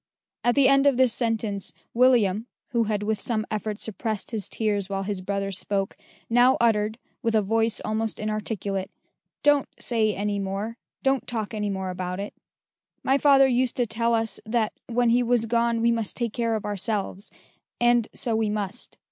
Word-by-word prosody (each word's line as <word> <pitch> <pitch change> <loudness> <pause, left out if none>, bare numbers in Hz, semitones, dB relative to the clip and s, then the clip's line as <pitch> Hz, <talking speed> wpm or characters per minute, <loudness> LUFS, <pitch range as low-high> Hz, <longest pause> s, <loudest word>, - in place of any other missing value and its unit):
At 240 - +3
the 280 -2 +6
end 275 +1 +5
of 275 -3 +3
this 255 -3 +4
sentence, 220 -4 -1 0.2
William, 230 -4 +3 0.2
who 235 -2 +2
had 210 -1 -1
with 215 -1 -1
some 215 -3 -1
effort 215 0 -3
suppressed 220 0 -4
his 220 -4 -2
tears 205 -3 -1
while 195 0 -2
his 200 -1 -3
brother 195 +1 -2
spoke, 195 0 -2 0.3
now 245 +2 +5
uttered, 215 -2 +2 0.2
with 230 -1 0
a 215 - +3
voice 225 +2 +2
almost 220 0 -2
inarticulate, 210 -2 -2 0.5
"Don't 290 -2 +4
say 220 -3 +1
any 205 0 -1
more; 200 +4 -4 0.2
don't 270 -1 +1
talk 225 -2 -3
any 210 -1 -2
more 190 -1 -3
about 180 0 -4
it. 200 +1 -5 0.7
My 270 +1 +3
father 275 -2 +6
used 250 -1 +1
to 245 - +2
tell 230 +1 +1
us, 225 -1 -1
that 220 -1 0
when 240 0 +2
he 245 +1 +4
was 240 -1 +2
gone 235 0 +1
we 235 0 +4
must 225 -3 -2
take 235 -3 -2
care 230 -2 0
of 215 - -4
ourselves: 205 -1 -3 0.5
and 240 -1 +3
so 230 -3 -1
we 220 -1 +1
must. 210 +1 -4
220 Hz, 180 wpm, -25 LUFS, 205-235 Hz, 0.7 s, the